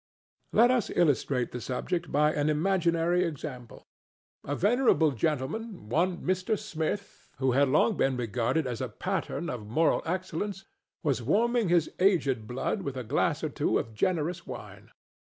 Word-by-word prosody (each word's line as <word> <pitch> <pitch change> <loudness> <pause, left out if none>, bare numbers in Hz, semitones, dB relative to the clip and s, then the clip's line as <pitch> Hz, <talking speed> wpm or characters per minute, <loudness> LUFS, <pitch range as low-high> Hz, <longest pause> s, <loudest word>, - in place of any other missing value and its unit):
Let 240 +3 +5
us 245 -5 +1
illustrate 140 -5 +1
the 125 - -5
subject 170 +8 -3
by 150 +2 +3
an 145 0 +1
imaginary 170 +1 +2
example. 140 -7 -6 0.6
A 145 - -2
venerable 205 - +3
gentleman—one 165 - -1
Mr. 185 +4 0
Smith—who 165 -7 -3
had 140 +3 +4
long 175 - +3
been 135 -1 +1
regarded 120 +6 0
as 125 -2 -3
a 130 - -2
pattern 175 - -3
of 115 -7 -5
moral 155 +9 +2
excellence 185 +2 -3 0.4
was 140 -6 +1
warming 225 - +2
his 170 -2 +3
aged 145 - +2
blood 130 - -2
with 140 -7 -4
a 125 - -3
glass 150 +7 0
or 155 - 0
two 145 - 0
of 115 -4 -4
generous 170 - -1
wine. - - -9
160 Hz, 145 wpm, -28 LUFS, 130-185 Hz, 0.6 s, Let